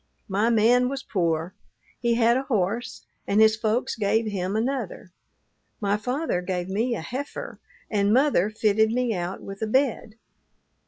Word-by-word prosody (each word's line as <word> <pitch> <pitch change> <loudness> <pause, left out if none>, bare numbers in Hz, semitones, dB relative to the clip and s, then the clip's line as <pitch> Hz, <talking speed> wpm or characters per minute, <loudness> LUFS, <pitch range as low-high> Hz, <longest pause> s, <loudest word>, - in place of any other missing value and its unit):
My 210 +3 +1
man 240 +2 +4
was 270 0 -4
poor. 170 -2 -1 0.5
He 235 -1 +1
had 235 0 +4
a 260 - +1
horse, 230 -2 -2 0.2
and 200 - +2
his 220 0 +6
folks 220 +2 -1
gave 220 +1 +1
him 195 -2 -2
another. 230 -6 -3 0.7
My 205 -1 +1
father 250 - -2
gave 180 -1 -3
me 230 +5 0
a 200 - -5
heifer, 260 - -6 0.3
and 200 -1 +1
mother 250 -6 +3
fitted 215 0 +2
me 240 0 0
out 180 0 -4
with 195 +1 -8
a 220 - 0
bed. 240 -2 0
220 Hz, 155 wpm, -25 LUFS, 195-240 Hz, 0.7 s, his